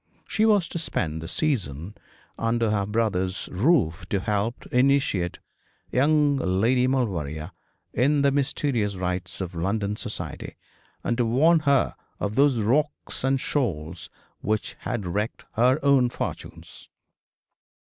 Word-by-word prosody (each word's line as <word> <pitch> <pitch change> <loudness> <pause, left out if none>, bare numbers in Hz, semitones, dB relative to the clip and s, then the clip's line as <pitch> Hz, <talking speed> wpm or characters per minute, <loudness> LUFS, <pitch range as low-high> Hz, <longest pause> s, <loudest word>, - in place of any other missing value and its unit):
She 220 +1 +2
was 205 -6 +4
to 170 - -4
spend 80 - -2
the 80 - -6
season 95 - -1 0.4
under 115 -1 0
her 100 -2 0
brother's 95 -4 -1
roof, 95 - +2
to 100 - +1
help 105 +3 -1
to - - -9
initiate 125 -9 +2 0.5
young 145 +1 +3
Lady 120 +4 +2
Maulevrier 85 - -1 0.4
in 140 +4 +2
the 140 - +4
mysterious 135 -6 0
rites 90 0 -3
of 90 -1 -4
London 100 +4 -1
society, 105 - -6 0.5
and 120 - 0
to 120 - +3
warn 160 +8 +4
her 140 -3 +2 0.3
of 105 0 -2
those 135 -1 +3
rocks 145 +8 0
and 135 0 +2
shoals 85 - -2 0.3
which 110 +1 -1
had 120 -6 -3
wrecked 105 +6 -3
her 125 +4 +4
own 135 -3 +5
fortunes. - - -7
115 Hz, 130 wpm, -25 LUFS, 95-135 Hz, 0.5 s, own